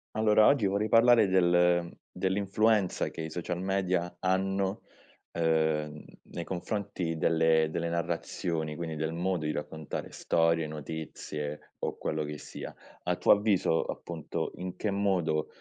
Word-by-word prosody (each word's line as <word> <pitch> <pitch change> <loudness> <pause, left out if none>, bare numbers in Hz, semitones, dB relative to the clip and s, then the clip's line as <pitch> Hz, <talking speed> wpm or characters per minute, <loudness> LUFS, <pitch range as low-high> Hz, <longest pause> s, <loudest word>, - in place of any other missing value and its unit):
Allora 110 0 +5
oggi 140 -7 +4
vorrei 100 +3 0
parlare 115 -2 +6
del 90 -1 +3 0.2
dell'influenza 100 +1 +1
che - - -7
i 80 - -4
social 85 +2 -4
media 95 -2 0
hanno, 95 +2 0 0.5
uhm, 80 -2 0 0.2
nei 85 - -6
confronti 90 -2 -3
delle 80 0 +3
delle 85 +1 -2
narrazioni, 85 -2 -2
quindi 80 -1 -4
del 80 +1 -2
modo 90 -1 -1
di 75 - 0
raccontare 80 0 -5
storie, 80 -1 +1
notizie, 75 -1 -6
o - - -3
quello 75 0 -2
che 75 0 -5
sia. - - -8 0.3
A - - 0
tuo - - +3
avviso, 100 -6 +3
appunto, 85 -3 -4
in 90 0 -6
che 105 - -2
modo, 95 -6 +1
85 Hz, 135 wpm, -29 LUFS, 80-95 Hz, 0.5 s, parlare